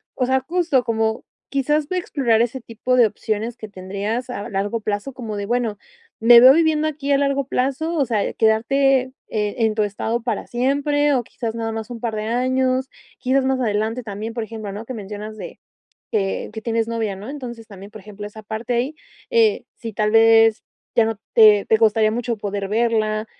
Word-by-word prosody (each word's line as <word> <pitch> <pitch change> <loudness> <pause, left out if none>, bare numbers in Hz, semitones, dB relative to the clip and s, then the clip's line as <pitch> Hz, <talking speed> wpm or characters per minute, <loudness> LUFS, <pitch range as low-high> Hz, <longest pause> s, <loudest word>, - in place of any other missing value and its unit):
o 255 - 0
sea, 260 +1 +1
justo 320 -2 +1
como 220 -1 -1 0.3
quizás 290 +2 0
ve 370 - -3
a - - +2
explorar 245 -10 +1
ese 245 +2 -1
tipo 235 +1 -2
de 240 -3 +6
opciones 215 +2 -3
que 215 -3 -9
tendrías 200 +6 -4
a 235 -2 -5
largo 205 +2 -2
plazo 210 +5 -3
como 225 -4 -6
de 200 - -3
bueno, 235 -1 -1 0.4
¿me 235 +1 +8
veo 255 +2 +10
viviendo 315 -1 +2
aquí 285 -2 -4
a - - +4
largo 275 0 0
plazo? 275 +6 -1
O 290 -4 +2
sea, 220 -4 -1
quedarte, 260 +4 +2 0.2
eh, 210 -2 -2
en 220 -2 +2
tu 215 - +2
estado 220 +3 -2
para 230 -3 -3
siempre 285 +4 +1
o 250 -3 +1
quizás 230 -1 -5
nada 225 -1 -3
más 220 0 -5
un 235 -2 -8
par 230 -2 -2
de 215 - -3
años, 255 +2 0 0.3
quizás 260 +1 +1
más 265 -1 +1
adelante 220 +2 -1
también, 215 +1 -6
por 230 -1 -3
ejemplo, 220 -2 -7
¿no? 210 +2 -6
Que 255 - -6
mencionas 210 +1 -7
de - - -9 0.5
que 195 -3 -1
que 220 0 -7
tienes 230 -1 0
novia, 225 -4 -2
¿no? 200 +4 -9
Entonces 245 -5 -7
también, 200 -1 -12
por 215 - -11
ejemplo, 205 0 -9
esa 215 +1 -11
parte 220 +3 -3
ahí, 255 +6 -1 0.4
eh, 455 -3 +3
si 230 -2 -7
tal 210 +1 0
vez 225 0 +5 0.3
ya 230 - +5
no 225 -2 -3 0.2
te 210 -2 +7
te 220 - +3
costaría 220 -1 +3
mucho 235 0 -2
poder 200 -1 -4
verla, 215 -1 0
230 Hz, 200 wpm, -21 LUFS, 215-260 Hz, 0.5 s, veo